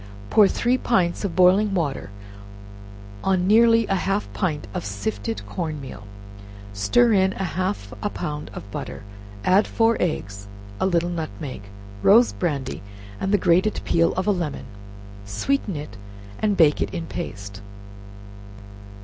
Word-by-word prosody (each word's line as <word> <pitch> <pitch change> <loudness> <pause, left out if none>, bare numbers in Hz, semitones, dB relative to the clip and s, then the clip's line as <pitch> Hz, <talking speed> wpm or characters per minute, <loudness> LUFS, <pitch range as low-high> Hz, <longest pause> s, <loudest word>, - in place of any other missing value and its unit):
Pour 210 -2 +7
three 245 +5 +1
pints 185 -7 +1
of 195 -4 -3
boiling 190 +3 +5
milk 145 - -2 1.1
on 185 -2 +2
nearly 230 +2 +5
half 195 +1 0
a - - -15
pint 160 -7 -2
of - - -3
sifted 100 +1 -4
corn 155 - -4
meal, 105 -7 -9 0.7
stir 230 - +3
in 190 -1 +3
half 185 - -3
a 210 - -1
pound 150 -5 -5
of - - -6
butter, - - -6 0.4
add 190 +3 +4
four 230 0 +2
eggs, 100 - -3 0.3
a - - +2
little 175 -1 +1
nutmeg, 145 -8 -5 0.4
rose 230 +5 +6
brandy, 145 -7 -3 0.4
and 195 - -1
the 205 - +5
grated 185 +3 +2
peel 165 0 +3
of 185 - -1
a 210 - +3
lemon, 170 -9 -3 0.6
sweeten 200 - -1
it, 145 -9 -7 0.4
and 210 -2 +1
bake 150 -3 +4
it - - -1
in 170 -2 -3
paste. 100 -5 -7
175 Hz, 140 wpm, -23 LUFS, 135-200 Hz, 1.1 s, Pour